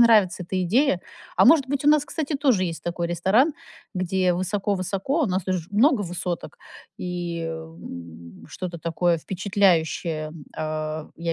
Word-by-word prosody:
нравится 215 -6 +5
эта 185 +2 -2
идея. 210 - +2 0.4
А - - +6
может 305 -5 +6
быть, 280 0 -1
у - - +5
нас, 300 -1 +5
кстати, 310 -1 -3
тоже 260 -10 +3
есть 165 -2 -4
такой 175 0 -2
ресторан, 190 - +3 0.4
где 185 0 +1
высоко-высоко, 195 - -1
у - - +2
нас 185 -2 -1
тут 185 - 0
же 170 -1 -6
много 225 +3 +4
высоток, 175 -1 -4 0.4
и, 175 -2 -3
эм, 85 - -9
что-то 175 +2 -6
такое 170 +2 +1
впечатляющее, 170 -4 +1
м, 155 -1 -11
а, 155 0 -3
я 170 0 -2
180 Hz, 155 wpm, -24 LUFS, 165-205 Hz, 0.4 s, А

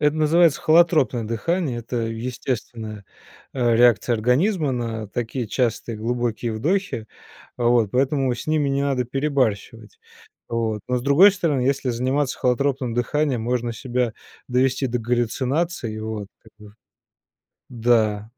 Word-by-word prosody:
это 150 +1 +2
называется 160 0 +3
холотропное 155 -7 +3
дыхание. 120 +5 -2
Это 120 +1 -5
естественная, 115 -2 -5 0.5
э, 120 -3 +2
реакция 120 0 +4
организма 140 - +1
на 115 -3 -3
такие 120 +2 -3
частые 115 -1 -1
глубокие 120 0 -2
вдохи. 145 - -1 0.5
Вот, 120 -3 +2
поэтому 135 -1 +1
с - - -8
ними 155 -2 +1
не 140 0 0
надо 135 -3 0
перебарщивать. 130 - -2 0.5
Вот, 115 -2 -2
но, 125 - +1
с 120 - -7
другой 145 +9 +6
стороны, 165 -9 0
если 135 0 0
заниматься 130 +3 -1
холотропным 130 0 0
дыханием, 130 +1 0
можно 120 0 -1
себя 125 0 -2 0.4
довести 130 +2 +1
до 125 - -1
галлюцинации, 125 +3 -1
и - - -6
вот, 110 -2 -5 0.2
как 110 - -20
бы 105 -1 -15 1.0
да, 110 -3 +1
125 Hz, 130 wpm, -22 LUFS, 115-140 Hz, 1.0 s, другой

